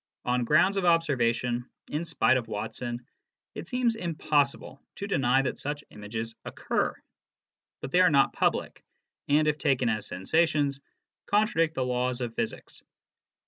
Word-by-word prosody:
On 125 0 +1
grounds 175 +9 +4
of 195 - 0
observation, 125 -7 +1 0.2
in 155 +3 -2
spite 155 -5 +3
of 120 -2 -4
Watson, 120 +3 -4 0.5
it - - -7
seems 250 -2 +1
impossible 150 -8 -1
to 200 - -5
deny 135 -8 +2
that 130 - -3
such 145 +1 -4
images 110 +2 -5
occur. - - -2 0.9
But 135 - -6
they 180 - +5
are 180 - +6
not 140 -2 +3
public, - - -1 0.4
and, 150 +2 +3
if 150 0 +1
taken 130 -4 +2
as 110 -2 -2
sensations, 145 - +1 0.5
contradict 205 -6 +2
the 130 - 0
laws 125 0 0
of 120 -2 -3
physics. - - -4
140 Hz, 140 wpm, -28 LUFS, 120-160 Hz, 0.9 s, are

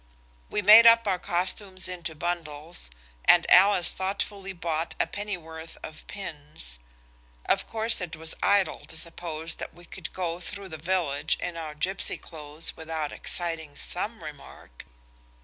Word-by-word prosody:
We 210 - -1
made 220 +4 +10
up 230 0 +7
our 190 -3 +1
costumes 185 +2 -2
into 175 -3 -5
bundles, 160 - -3 0.4
and 175 - +7
Alice 190 -1 +7
thoughtfully 195 +1 -3
bought 170 -3 -2
a - - +4
pennyworth 165 -6 -6
of 155 - -9
pins. 145 - -8 0.7
Of - - +1
course 225 -1 +1
it 175 -2 -4
was 160 0 -4
idle 200 -1 +3
to 160 - -3
suppose 165 -1 -1
that - - -7
we 175 0 -13
could 175 0 -8
go 175 -2 -2
through 200 +1 -6
the 160 - -6
village 160 -4 0
in 175 - -3
our 155 -2 -5
gipsy 190 +5 -1
clothes 150 -1 -6
without 160 -2 -3
exciting 165 -4 -4
some 210 +2 -3
remark. 145 - -11
175 Hz, 145 wpm, -27 LUFS, 160-190 Hz, 0.7 s, made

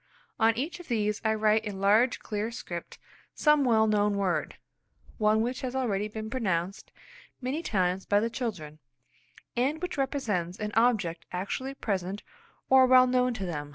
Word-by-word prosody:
On 225 0 +3
each 310 +8 -3
of 355 - -12
these 210 -3 -1
I 220 -1 +2
write 215 0 +2
in 205 -3 -5
large 215 +6 +3
clear 210 +1 -3
script 175 -7 -7 0.4
some 300 -2 +4
well 225 -4 +4
known 210 -1 +2
word, 180 -6 -1 0.6
one 215 0 +3
which 245 +3 -2
has 255 0 -4
already 210 -6 0
been 215 +1 -6
pronounced 195 -6 -2 0.5
many 265 +5 -3
times 185 - -1
by 205 - +4
the 225 - 0
children, 170 - -5 0.8
and 270 +6 0
which 360 -4 -4
represents 210 - -1
an 210 -1 -3
object 215 -8 +1
actually 260 +9 -4
present 195 -4 -3 0.4
or 260 -1 +6
well 255 0 +7
known 250 -1 +1
to 195 -3 -4
them. 150 -4 -5
220 Hz, 160 wpm, -28 LUFS, 195-250 Hz, 0.8 s, well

